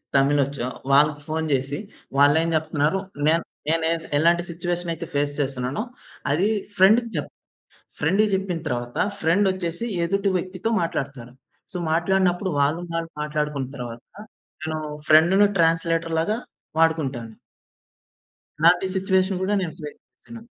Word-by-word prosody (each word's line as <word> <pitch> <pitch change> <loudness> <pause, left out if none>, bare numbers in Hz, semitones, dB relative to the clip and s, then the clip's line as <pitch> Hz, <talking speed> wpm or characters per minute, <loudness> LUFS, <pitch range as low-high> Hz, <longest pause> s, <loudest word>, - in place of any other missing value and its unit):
తమిలోచ్చో 140 -2 +2 0.2
వాళ్ళకి 145 +1 +4
ఫోన్ 160 +1 -1
జేసి, 135 +1 0 0.4
వాళ్ళేం 145 +4 +5
జెప్తున్నారు 155 +2 +1 0.3
నేను 165 +2 +3 0.2
నేనె 165 +1 +1 0.3
ఎలాంటి 170 +3 +3
సిట్యుయేషన్ 175 0 -3
అయితే 165 +1 -6
ఫేస్ 145 0 0
చేస్తున్నానో, 135 +5 -2 0.5
అది 175 +8 +2 0.3
ఫ్రెండ్‌కి 220 +5 +5
జెప్ - - -3 0.7
ఫ్రెండ్‌కి 215 +3 +3
జేప్పిన 190 -3 -1
తరువాత 120 -2 -3 0.2
ఫ్రెండొచ్చేసి 185 +2 +1 0.2
ఎదుటి 195 +3 +1
వ్యక్తితో 185 +4 -3
మాట్లాడతారు. 135 -7 -4 0.4
సో, - - -2
మాట్లాడినప్పుడు 180 +2 +2
వాళ్ళు 145 +4 +2
వాళ్ళు 165 0 -2
మాట్లాడుకున్న 150 -3 -2
తర్వాత, 120 -2 -6 0.6
నేను 155 0 -2 0.3
ఫ్రెండును 175 +6 +6
ట్రాన్స్‌లేటర్‌లాగా 165 +3 +1 0.4
వాడుకుంటాను. 140 -8 +1 1.3
ఇలాంటి 175 +3 +5
సిట్యుయేషన్ 190 0 +1
గూడా 200 +2 +1
నేను 170 -4 -3
ఫేస్ 150 -1 -8
చేశాను. 235 -1 -12
165 Hz, 115 wpm, -23 LUFS, 145-185 Hz, 1.3 s, ఫ్రెండును